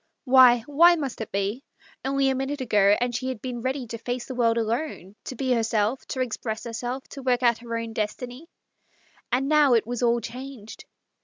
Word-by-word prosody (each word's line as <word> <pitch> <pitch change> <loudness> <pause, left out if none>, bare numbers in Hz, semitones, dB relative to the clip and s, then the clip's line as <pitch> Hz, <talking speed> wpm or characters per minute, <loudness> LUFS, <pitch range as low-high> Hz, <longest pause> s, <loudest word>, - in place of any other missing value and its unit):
Why, 255 -3 +6
why 335 +5 +6
must 275 -8 -4
it 220 - -6
be? 200 +6 -2 0.4
Only 275 0 +1
a - - -1
minute 270 +2 -3
ago 210 -5 +3
and 245 0 -1
she 255 - -3
had 260 -4 -4
been 245 0 -5
ready 260 +1 -2
to 230 0 -7
face 245 +1 -4
the 260 - -6
world 235 -2 +2
alone, 225 - -3
to 255 - -6
be 260 +1 -2
herself, 225 +1 0
to 260 - -3
express 220 -2 -3
herself, 245 +3 -5
to 275 - -9
work 250 -1 +1
out 235 -2 +3
her 230 -1 -4
own 230 -1 -5
destiny. 245 +7 -5 0.8
And 260 +3 +1
now 295 -4 +5
it 225 - +2
was 245 +1 -4
all 240 -1 +3
changed. 245 -1 -9
245 Hz, 200 wpm, -25 LUFS, 230-265 Hz, 0.8 s, Why